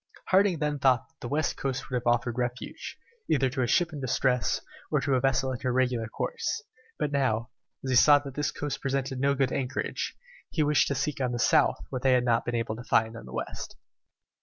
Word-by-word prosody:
Harding 190 -2 +4
then 150 -1 -1
thought 130 -3 +3
that 160 - -38
the - - -6
western 150 +4 -1
coast 135 -2 -2
would 130 - -3
have 120 -1 -2
offered 120 0 +2
refuge, 125 0 -4 0.3
either 135 -3 +2
to 130 0 -2
a 120 - +1
ship 175 +5 +2
in 145 - -6
distress, 125 -1 +1 0.3
or - - +2
to 140 - 0
a 130 - +4
vessel 135 0 +1
in 125 - -4
her 130 - -1
regular 125 -3 +1
course; 440 - -3 0.3
but 145 - -1
now, 115 -5 0 0.3
as 130 - -1
he - - +2
saw 145 +4 +8
that 140 -2 -6
this 145 +1 -1
coast 145 -1 -4
presented 135 -1 -2
no 140 +1 +2
good 135 -1 +1
anchorage, 130 -2 -3 0.3
he 155 - +1
wished 150 0 +3
to 140 - -1
seek 140 +1 -2
on 125 -1 0
the - - -1
south 115 - +3
what 130 - -3
they 130 0 +4
had 125 -1 +3
not 115 -1 +2
been 120 - -2
able 115 -1 -1
to 120 - -8
find 115 -1 +2
on - - -9
the - - -10
west. - - -5
130 Hz, 230 wpm, -28 LUFS, 125-140 Hz, 0.3 s, saw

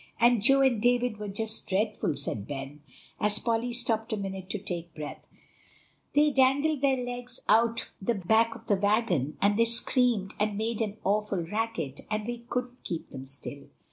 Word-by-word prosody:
"And 240 -2 +5
Joe 270 +5 +5
and 255 -5 +3
David 245 -1 +2
were 210 0 -5
just 220 +2 -1
dreadful," 195 -5 0
said 110 -7 -3
Ben, 140 +1 -6 0.4
as 210 0 +4
Polly 230 +2 0
stopped 235 -1 +1
a 215 - 0
minute 190 -2 -5
to 210 - -2
take 175 -4 -6
breath; 150 -1 -7 0.9
"they 295 +1 +5
dangled 275 +2 +3
their 270 -2 +3
legs 245 0 -5
out 230 +1 +3
the 230 +5 0
back 220 +4 +2
of 225 - -13
the 205 -3 +2
wagon, 195 - +1
and 205 +2 +3
they 230 - +6
screamed 235 -3 +1
and 210 -1 0
made 225 +1 -1
an 215 -1 -2
awful 205 -2 0
racket 175 - -3 0.2
we 240 +1 -4
couldn't 250 0 -4
keep 170 -2 -5
them 135 -1 -8
still. 140 +1 -8
220 Hz, 170 wpm, -28 LUFS, 190-240 Hz, 0.9 s, they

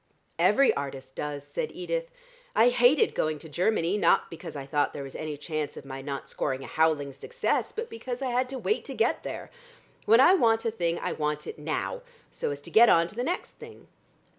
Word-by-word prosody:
"Every 275 -1 +5
artist 135 -1 -6
does," 145 0 -4
said 470 - -3
Edith. - - -3 0.5
"I 245 - +6
hated 245 +4 +4
going 155 0 0
to 155 - -11
Germany, 180 +4 +1
not - - +3
because 160 -2 -8
I 140 -1 -5
thought 145 +1 0
there 140 - -5
was 135 - -9
any 155 -2 -5
chance 155 0 -4
of - - -9
my 135 0 -7
not 140 0 -5
scoring 135 -1 -3
a - - -7
howling 155 -3 +1
success, 480 - -1
but 455 +1 -4
because 240 +2 -6
I 255 - -1
had 250 +1 +1
to 265 - -4
wait 430 - 0
to - - -6
get - - +1
there. - - -7 0.5
When 225 +3 +6
I 345 +8 +8
want 225 -9 +3
a 225 - +1
thing 170 -5 -1
I - - -2
want 150 0 -2
it - - -7
now, 160 - -3 0.3
so - - -3
as 145 0 -5
to - - -10
get 230 +1 +7
on 165 0 +5
to - - -12
the 245 - -1
next 350 +7 -2
thing." - - -12
165 Hz, 215 wpm, -28 LUFS, -, 0.5 s, I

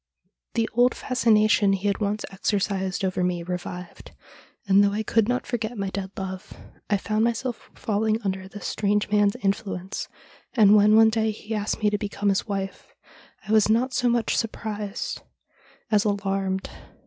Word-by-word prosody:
The 230 -1 +1
old 245 +2 +3
fascination 215 -5 +3
he 195 +1 -3
had 200 -1 +1
once 210 0 -1
exercised 195 -1 -1
over 185 -1 -1
me 180 -1 -1
revived, 180 0 -7 0.5
and, 195 +1 +6
though 200 0 +2
I 215 +1 -1
could 220 0 +2
not 250 0 0
forget 235 -1 -3
my 195 -1 -2
dead 190 0 -4
love, 190 -1 -6 0.4
I 205 - +3
found 215 +2 0
myself 235 +1 -2
falling 215 +1 0
under 190 -1 -3
this 205 +1 -9
strange 205 0 0
man's 205 -1 +3
influence, 195 -2 -2 0.5
and, 210 -3 +7
when 210 +1 +6
one 220 0 +7
day 220 0 +1
he 215 +1 -6
asked 210 0 -2
me 210 - +4
to 205 - 0
become 205 -1 -1
his 195 - 0
wife, 195 -2 -5 0.5
I - - -3
was 215 -1 +4
not 245 +4 +2
so 245 -1 +2
much 235 -1 +1
surprised 215 -2 -3 0.7
as 210 -1 +4
alarmed. 195 -2 -1
205 Hz, 165 wpm, -25 LUFS, 195-220 Hz, 0.7 s, and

